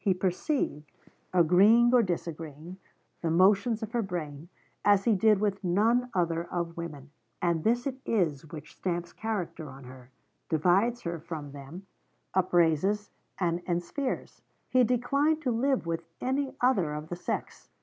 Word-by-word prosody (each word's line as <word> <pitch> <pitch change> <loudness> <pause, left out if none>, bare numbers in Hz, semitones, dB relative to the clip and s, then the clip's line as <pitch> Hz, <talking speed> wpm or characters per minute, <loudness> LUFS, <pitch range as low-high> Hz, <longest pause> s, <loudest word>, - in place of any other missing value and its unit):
He 195 -3 +3
perceived, 180 - -1 0.4
agreeing 200 +8 +5
or 250 - +7
disagreeing, 165 -2 -5 0.4
the 165 - -1
motions 200 +6 +3
of 220 - -5
her 240 -1 0
brain, 165 -5 -5 0.3
as 200 -1 +4
he 230 - +3
did 210 +1 +4
with 200 -1 -1
none 225 +7 +2
other 170 -1 0
of 170 -1 -3
women; 150 -4 -7 0.3
and 170 -2 0
this 240 +2 +2
it 265 -2 -3
is 160 -9 0
which 155 -3 -9
stamps 175 -1 -3
character 185 -8 -4
on 135 +1 -12
her, 125 0 -13 0.4
divides 190 +9 +2
her 170 -3 -4
from 155 -3 -7
them, 145 +7 -10 0.5
upraises 185 +3 +2 0.3
and 170 -2 +1
enspheres. 175 +10 -3 0.3
He 255 -1 +5
declined 280 +6 +2
to 255 - +1
live 255 -1 +1
with 165 0 -2 0.2
any 265 +1 -1
other 195 -12 +2
of 150 +1 -7
the 175 - -3
sex. 175 - -5
180 Hz, 150 wpm, -29 LUFS, 165-225 Hz, 0.5 s, or